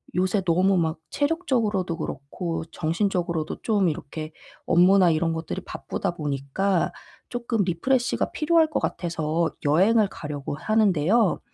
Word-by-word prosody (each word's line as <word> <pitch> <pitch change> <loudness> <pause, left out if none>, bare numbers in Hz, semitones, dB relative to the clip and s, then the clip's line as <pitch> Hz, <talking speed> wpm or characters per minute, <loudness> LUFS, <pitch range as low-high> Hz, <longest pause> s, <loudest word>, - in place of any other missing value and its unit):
요새 185 +2 +1
너무 185 +3 +3
막 160 -2 0
체력적으로도 235 - 0
그렇고 165 +5 -4
정신적으로도 170 -1 -1
좀 205 -6 +2
이렇게 155 +1 -6 0.3
업무나 180 +1 +5
이런 165 +1 +1
것들이 160 0 -4
바쁘다 - - -3
보니까 155 +6 -1 0.4
쪼끔 235 -3 -1
리프레시가 245 +9 0
필요할 320 0 +3
것 305 - 0
같아서 165 -1 -1
여행을 200 +9 +4
가려고 145 -5 -5
하는데요. 205 +1 +2
180 Hz, 325 characters per minute, -25 LUFS, 160-215 Hz, 0.4 s, 업무나